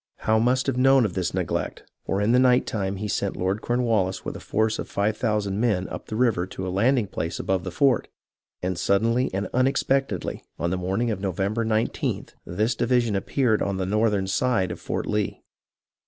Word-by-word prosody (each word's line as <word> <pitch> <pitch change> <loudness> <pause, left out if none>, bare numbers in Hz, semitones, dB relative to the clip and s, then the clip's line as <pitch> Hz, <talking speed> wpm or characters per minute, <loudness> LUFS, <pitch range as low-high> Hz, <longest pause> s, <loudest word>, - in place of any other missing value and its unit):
Howe 110 0 +3
must 125 +3 +2
have 135 -3 -1
known 135 -1 +5
of 100 - -2
this 90 -2 -1
neglect, - - -2 0.2
for 95 - 0
in 105 +3 +2
the 125 - +5
night 125 -1 +4
time 100 -2 -2
he 105 +2 -4
sent 100 - -2
Lord 95 +4 -1
Cornwallis 115 -6 0
with - - -4
a - - -6
force 110 0 0
of - - -5
five 105 +2 0
thousand 105 -3 -1
men 105 -6 +1
up - - -7
the 110 - -5
river 110 -7 +2
to 95 0 -6
a 90 - -3
landing 120 +4 +3
place 85 -3 -4
above 95 -2 0
the 95 - -4
fort, 130 +6 +2 0.6
and 90 -1 -1
suddenly 115 +7 +2
and 100 +2 -2
unexpectedly, 135 -4 0
on 85 - -1
the - - +1
morning 95 +6 -1
of 105 - -3
November 100 +4 -1
19th, 110 +1 -1
this 110 +7 0
division 120 -3 +1
appeared 110 +3 +1
on 100 -1 -1
the 95 - -1
northern 105 0 +1
side 95 -1 +1
of - - -6
Fort - - -3
Lee. 105 -1 -2
105 Hz, 200 wpm, -25 LUFS, 95-120 Hz, 0.6 s, known